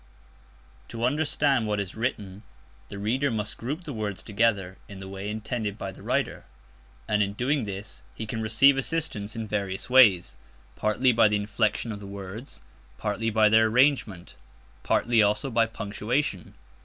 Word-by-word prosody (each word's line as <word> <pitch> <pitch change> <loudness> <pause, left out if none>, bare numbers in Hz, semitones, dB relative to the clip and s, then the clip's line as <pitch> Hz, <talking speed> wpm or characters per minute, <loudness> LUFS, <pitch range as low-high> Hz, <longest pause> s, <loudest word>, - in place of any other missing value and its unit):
To 115 - -6
understand 140 -3 +1
what 105 -1 0
is 100 -3 -4
written, 105 -4 -4 0.5
the 100 - -7
reader 125 +8 0
must 110 -3 -3
group 145 +9 -4
the 150 - -6
words 105 -4 -4
together 100 -4 0
in 100 - -10
the 95 0 -8
way 95 +1 -6
intended 110 -1 -3
by 95 -2 -5
the 95 - -14
writer; - - -2 0.6
and 105 -1 +2
in 100 -1 0
doing 130 +3 0
this 100 0 -7
he - - -5
can 110 +1 -4
receive 115 +6 +4
assistance 135 -9 -2
in 115 -1 -4
various 100 +1 -3
ways. 105 -9 +6 0.4
Partly 105 +5 +2
by 115 -2 +5
the 105 - +1
inflection 105 +2 -1
of 105 - -6
the 100 - -9
words; 100 +5 -8 0.4
partly 110 +2 -1
by 110 -1 +4
their 110 +1 +5
arrangement; 125 -6 +1 0.5
partly 120 -1 +2
also 105 +6 +1
by 115 0 +3
punctuation. 110 - -3
110 Hz, 160 wpm, -26 LUFS, 100-120 Hz, 0.6 s, ways